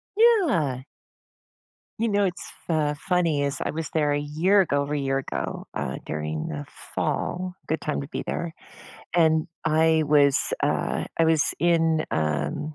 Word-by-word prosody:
Yeah. 295 - +3 1.2
You 230 0 +1
know, 205 0 +2
it's 180 -2 -4 0.2
fa 150 -3 +1
funny 170 -5 +1
is, 140 -1 -1
I - - -1
was 160 0 -4
there 150 -2 +2
a 145 - +1
year 165 +8 +3
ago 145 -5 +1
over 140 +1 -3
a 150 - 0
year 135 0 0
ago, - - -4
uh, 65 - -3
during 75 0 -3
the 75 -1 -5 0.3
fall- 180 0 -2
good 160 - -1
time 150 - -2
to 140 - -7
be - - -4
there- 170 -2 -3 0.6
and 160 -2 +4 0.2
I 160 0 +3
was, 145 -2 +4
uh - - 0
I 165 - +5
was 160 -2 +4 0.2
in, 165 -2 +2
um 75 - -1
155 Hz, 160 wpm, -25 LUFS, 140-170 Hz, 1.2 s, I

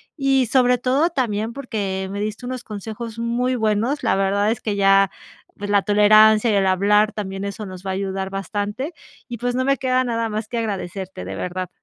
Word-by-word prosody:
y 270 -3 +2
sobre 250 +1 +3
todo, 265 +7 +2
también 225 -7 -1
porque 205 -7 -3
me 200 - -4
diste 215 +3 -4
unos 255 -1 -5
consejos 220 +2 -7
muy 245 +2 0
buenos. 225 +5 0
La - - +2
verdad 200 +2 +1
es 230 - -3
que 210 -2 -2
ya, 195 0 +5 0.5
pues, 205 0 -5
la 200 -1 +4
tolerancia 215 +2 +5
y - - +2
el 195 -1 +2
hablar 210 +3 +3
también 195 -2 -5
eso 210 +2 -5
nos 185 -1 -9
va - - -3
a - - -2
ayudar 190 0 -3
bastante, 205 - -4 0.3
y 240 -2 -6
pues, 245 +1 -1
no 255 +1 0
me 275 0 +2
queda 255 0 +1
nada 230 -2 -1
más 215 0 -3
que 235 0 -3
agradecerte, 190 - -5
de 95 +1 -5
verdad. 180 - -4
215 Hz, 205 wpm, -21 LUFS, 195-245 Hz, 0.5 s, ya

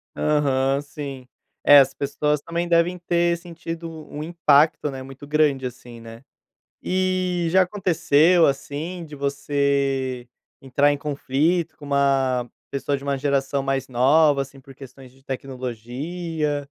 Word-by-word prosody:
Aham, 140 -2 +1
sim. 140 -3 -8 0.4
É, 145 0 +9
as 135 0 +3
pessoas, 145 +1 -1
também, 170 +3 -3
devem 170 +1 +2
ter 170 -1 +1
sentido 170 -1 -7 0.2
um 150 - -6
impacto, 155 -2 +3
né, 135 -1 -7
muito 135 +2 -11
grande 145 -3 +2
assim, 120 -1 -9
né. 115 +2 -12 0.6
E 185 -2 0
já 185 +2 +5
aconteceu, 175 -3 +3
assim, 150 +6 -4
de 150 -1 -10
você 140 -2 -1 0.3
entrar 140 +2 +2
em 145 - -1
conflito 150 +4 -1
com 145 - -11
uma 135 -3 +1 0.2
pessoa 140 +1 -1
de 135 - -11
uma 140 -1 -1
geração 140 0 0
mais 135 0 -2
nova, 140 +4 +4
assim, 135 0 -9
por 135 +1 -15
questões 130 -1 -13
de 135 +1 -25
tecnologia? 135 +5 -4
140 Hz, 135 wpm, -23 LUFS, 135-165 Hz, 0.6 s, É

